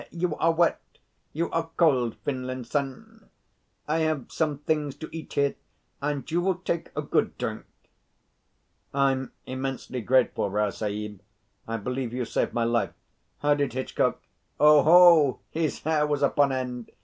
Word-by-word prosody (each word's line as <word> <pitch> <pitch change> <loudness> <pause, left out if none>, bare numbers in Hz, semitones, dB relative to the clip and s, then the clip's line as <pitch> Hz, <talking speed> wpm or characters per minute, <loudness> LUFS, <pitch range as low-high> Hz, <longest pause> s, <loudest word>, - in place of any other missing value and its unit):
You 170 -2 -2
are 165 - +3
wet? 170 +1 +2 0.5
You 170 +2 -2
are 165 0 -1
cold, 130 -9 +3
Finlinson? 135 - -4 0.6
I 155 +2 +1
have 155 -5 -1
some 155 -3 0
things 150 -1 -1
to 160 - -8
eat 160 - -8
here, 140 -1 +2 0.5
and 145 -1 -2
you 170 +2 +2
will 190 +1 +1
take 170 -2 -3
a - - -2
good - - 0
drink." - - -4 1.3
"I'm 135 -1 +1
immensely 130 -1 -4
grateful, 125 -3 +2
Rao 105 +1 0
Sahib. 105 -1 -5 0.5
I 115 0 -2
believe 125 +2 -3
you've 125 -2 -3
saved - - 0
my 120 - 0
life. 115 0 0 0.5
How 145 0 +4
did 140 -4 -1
Hitchcock 130 +1 -1 0.2
" - - -44
"Oho! 150 0 +7
His 160 -2 -2
hair 155 -1 +2
was 145 -1 0
upon 140 0 +3
end. 125 -3 -4
140 Hz, 150 wpm, -26 LUFS, 125-160 Hz, 1.3 s, Oho